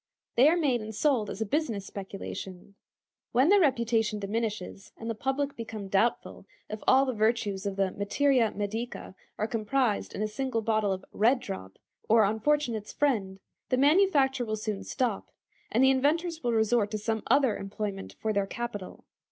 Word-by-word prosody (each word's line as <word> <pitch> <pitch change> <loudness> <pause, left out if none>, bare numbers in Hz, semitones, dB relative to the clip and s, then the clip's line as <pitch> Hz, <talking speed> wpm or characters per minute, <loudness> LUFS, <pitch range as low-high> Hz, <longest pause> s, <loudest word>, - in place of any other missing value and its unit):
They 255 +4 +6
are 340 - +2
made 270 -8 +1
and 215 0 -7
sold 245 -6 +1
as 205 - -6
a - - +1
business 225 -5 -1
speculation. 195 -1 -7 0.6
When 260 +6 +4
their 405 +1 +6
reputation 230 - +2
diminishes, 205 -2 -4
and 225 - -7
the - - -1
public 270 +5 -2
become 220 -4 -7
doubtful 205 +5 0 0.2
if 215 - -5
all 265 +1 +6
the 260 - -1
virtues 215 -3 0
of 195 - -3
the 195 -1 +1
materia 235 +4 +2
medica 215 +2 -4 0.2
are 215 - 0
comprised 225 +1 -1
in 210 - -2
a - - 0
single 230 +1 -2
bottle 215 -2 +1
of 190 0 -4
"Red 240 +5 +3
Drop," 145 - -7 0.3
or 225 0 +6
"Unfortunate's 220 +1 0
Friend," 205 -10 0 0.3
the 255 - +2
manufacture 280 -3 +4
will 215 -2 -2
soon 215 -2 -4
stop, 240 -6 -2 0.4
and 240 +4 +3
the 265 - +6
inventors 320 +5 +1
will 240 - +1
resort 220 -1 +2
to 215 - -3
some 220 +1 -2
other 265 -7 +3
employment 195 0 -5
for 220 -1 -1
their 200 -1 0
capital. 205 -4 -6
225 Hz, 170 wpm, -28 LUFS, 205-265 Hz, 0.6 s, They